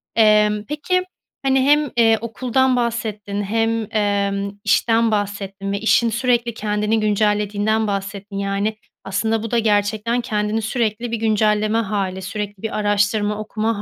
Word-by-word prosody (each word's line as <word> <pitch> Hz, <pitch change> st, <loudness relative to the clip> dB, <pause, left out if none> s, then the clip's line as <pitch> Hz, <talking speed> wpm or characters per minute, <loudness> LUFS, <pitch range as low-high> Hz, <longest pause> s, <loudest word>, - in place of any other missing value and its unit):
Emm, 210 Hz, -1 st, +4 dB
peki 365 Hz, +5 st, 0 dB, 0.4 s
hani 265 Hz, 0 st, +3 dB
hem, 290 Hz, 0 st, +3 dB
eee, 225 Hz, -1 st, +5 dB
okuldan 255 Hz, +3 st, +1 dB
bahsettin 215 Hz, -4 st, -2 dB
hem, 225 Hz, +1 st, 0 dB
emm, 200 Hz, -1 st, 0 dB
işten 230 Hz, 0 st, +3 dB
bahsettin 200 Hz, -1 st, -3 dB
ve 200 Hz, -, -1 dB
işin 230 Hz, +2 st, +3 dB
sürekli 240 Hz, 0 st, 0 dB
kendini 210 Hz, +1 st, 0 dB
güncellediğinden 210 Hz, +1 st, +1 dB
bahsettin. 200 Hz, 0 st, -4 dB
Yani, 200 Hz, +2 st, -1 dB, 0.3 s
aslında 220 Hz, +3 st, -1 dB
bu 225 Hz, -, -5 dB
da 235 Hz, -, +3 dB
gerçekten 215 Hz, +2 st, +1 dB
kendini 215 Hz, -1 st, -1 dB
sürekli 225 Hz, 0 st, -2 dB
bir 230 Hz, -, -1 dB
güncelleme 215 Hz, 0 st, +1 dB
hâli, 195 Hz, -4 st, -2 dB
sürekli 205 Hz, +1 st, -5 dB
bir 220 Hz, -, -3 dB
araştırma 205 Hz, 0 st, +1 dB
okuma 215 Hz, 0 st, -2 dB
215 Hz, 135 wpm, -20 LUFS, 205-230 Hz, 0.4 s, eee